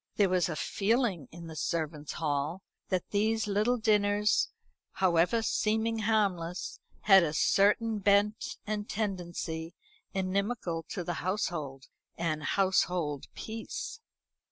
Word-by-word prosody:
There 200 -2 +3
was 180 -1 +2
a 160 - -2
feeling 200 - 0
in 170 +1 -10
the 160 -1 -8
servants' 155 -1 -2
hall 155 +3 -2 0.3
that 185 -2 -1
these 220 +1 +1
little 210 +4 +2
dinners, 210 -2 +2 0.4
however 185 +4 +3
seeming 220 +1 +1
harmless, 195 -6 0 0.2
had 195 -2 +7
a 155 -3 0
certain 210 +5 +3
bent 205 +2 +2
and 210 0 -3
tendency 175 -5 -3 0.4
inimical 190 -2 -1
to 180 - -3
the 175 - -2
household, 155 -8 -2 0.3
and 165 -2 -1
household 180 -4 +1
peace. 225 - -6
190 Hz, 115 wpm, -30 LUFS, 165-215 Hz, 0.4 s, had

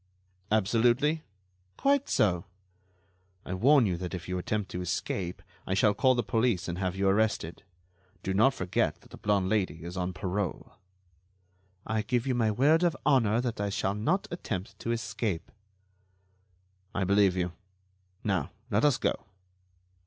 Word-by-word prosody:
"Absolutely?" 120 +9 +3 0.6
"Quite 280 0 +2
so." 90 -3 +2 1.0
"I 90 - -4
warn 130 +7 +5
you 90 -4 0
that 90 +1 -4
if 90 -1 -7
you 90 0 -2
attempt 105 +2 -2
to 90 - -4
escape, 90 0 -3 0.2
I 95 - 0
shall 105 +1 +4
call 130 +4 +3
the 120 - 0
police 110 -4 +1
and 85 0 -4
have 95 -1 -1
you 95 0 +1
arrested. 100 -4 +1 0.6
Do 95 - -1
not 125 +8 +4
forget 95 -1 -1
that - - -20
the - - -10
blonde 100 -3 +1
Lady 95 -6 0
is 85 +2 -6
on 90 0 -2
parole." 90 +2 -3 1.1
"I 110 0 0
give 125 +2 -1
you 130 - +1
my 115 -3 +2
word 145 +9 +4
of 175 -2 +2
honor 120 -6 +3
that 120 -4 -3
I 100 - 0
shall 100 -1 -1
not 155 - 0
attempt 105 - -5
to 115 - -2
escape." 110 -5 -3 1.4
"I 100 - +1
believe 100 -1 +3
you. 90 -1 0 0.7
Now, 95 -8 0 0.2
let 105 +1 +2
us 145 -4 +4
go." - - +1
105 Hz, 155 wpm, -29 LUFS, 95-120 Hz, 1.4 s, warn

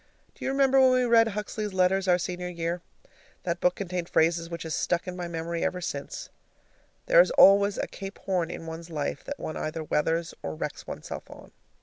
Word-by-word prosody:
Do - - -12
you - - 0
remember 270 0 +4
when 260 - +7
we 255 0 +3
read 230 -1 +5
Huxley's 210 -1 -4
letters 190 +1 +2
our 180 -1 +5
senior 180 0 -4
year? 170 0 -3 0.6
That 170 -1 -2
book 180 +1 +2
contained 180 -3 -3
a - - -21
phrase 165 +1 +2
which 170 -1 -5
has 160 -1 -4
stuck 175 +1 0
in 180 - -4
my 175 -1 -4
memory 165 0 -3
ever 180 - -1
since: 145 -6 -5 0.8
"There - - +7
is - - +2
always 200 - +6
a - - -1
Cape 195 +1 -8
Horn 180 -4 -1
in - - -7
one's 165 +1 -7
life 150 -3 -3
that 285 - -5
one 155 - -5
either 155 +1 -3
weathers 160 +2 0
or 80 -1 -4
wrecks - - -5
oneself - - -7
on." - - -13
180 Hz, 210 wpm, -27 LUFS, 165-200 Hz, 0.8 s, when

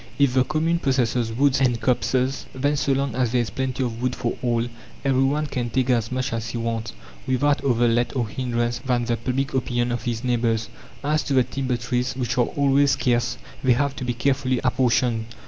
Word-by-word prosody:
If 140 -3 +3
the 130 -1 +4
commune 160 +4 0
possesses 125 -5 +1
woods 135 +3 +2
and 120 -3 +2
copses, 130 +3 0
then, 145 +3 +1
so 140 -1 0
long 135 -2 -1
as 125 -2 0
there 125 -1 +2
is 115 - -3
plenty 130 0 -2
of 115 -1 -4
wood 125 0 0
for 120 - -2
all, 120 -1 0 0.4
every 135 -1 +3
one 145 +3 +1
can 125 -4 -3
take 130 +2 +1
as 115 -1 +1
much 130 -1 -2
as 115 0 -3
he 120 - -4
wants, 115 -1 -3 0.3
without 140 +2 +2
other 120 -3 +3
let 120 +3 +1
or 120 -4 0
hindrance 120 0 -2
than 125 -3 0
the 120 0 +1
public 130 +4 -2
opinion 120 -2 0
of 120 - -2
his 120 0 -3
neighbours. 115 -3 0 0.3
As 150 +2 +1
to 140 - 0
the 130 - +5
timber 130 -1 -2
trees, 125 +1 -2
which 125 -2 -2
are 120 - +4
always 140 0 +3
scarce, 120 -1 +1 0.3
they 130 -1 +5
have 140 +2 0
to - - -4
be 120 -1 -2
carefully 130 0 +1
apportioned. 125 -3 +1
125 Hz, 210 wpm, -23 LUFS, 120-135 Hz, 0.4 s, the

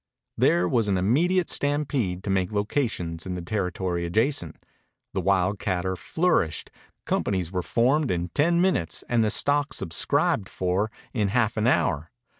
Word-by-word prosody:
There 85 +1 +3
was 115 +3 +1
an 100 -2 +1
immediate 165 - +2
stampede 135 -11 0
to 100 - -2
make 95 -1 0
locations 100 - -2
in 90 - -3
the 90 - -4
territory 90 -2 -2
adjacent. 105 - 0 0.6
The 95 - -1
wildcatter 95 0 0
flourished. 100 - 0 0.3
Companies 90 -4 -1
were 90 -1 -1
formed 130 - +1
in 85 -1 -1
ten 170 - +2
minutes 175 - 0
and 120 -2 +2
the 110 - +2
stock 145 +6 +2
subscribed 95 +4 0
for 95 +4 -1 0.2
in 105 -4 +1
half 110 +1 +1
an 110 +1 +1
hour. 80 - +1
100 Hz, 145 wpm, -25 LUFS, 90-125 Hz, 0.6 s, There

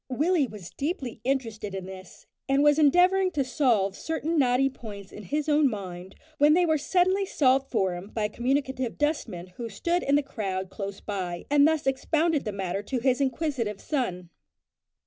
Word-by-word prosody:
Willie 300 +3 +2
was 205 -6 -10
deeply 275 -6 -4
interested 225 -6 -2
in 190 -1 -5
this, 185 -1 -11 0.2
and 275 +1 +3
was 295 +1 +5
endeavouring 360 +5 +4
to 280 - +1
solve 240 -7 +1
certain 320 +3 -2
knotty 255 0 +3
points 210 -7 -9
in 210 - -10
his 295 - -2
own 295 -2 +4
mind, 190 -3 -7 0.2
when 295 +2 +6
they 355 0 +4
were 315 -2 +2
suddenly 370 +5 +2
solved 270 -7 +2
for 190 -6 +1
him 175 +2 -7
by 220 - -3
a 210 - 0
communicative 260 +1 -1
dustman 250 - -1
who 235 -1 -5
stood 340 - -1
in 280 - +2
the 290 - +3
crowd 190 -7 -4
close 195 0 -6
by, 180 -4 -4
and 290 0 +6
thus 315 -1 0
expounded 305 +3 +1
the 210 - -2
matter 195 -1 -3
to 255 +5 -3
his 255 +2 +1
inquisitive 260 -6 -1
son. 180 - -3
260 Hz, 180 wpm, -27 LUFS, 200-295 Hz, 0.2 s, when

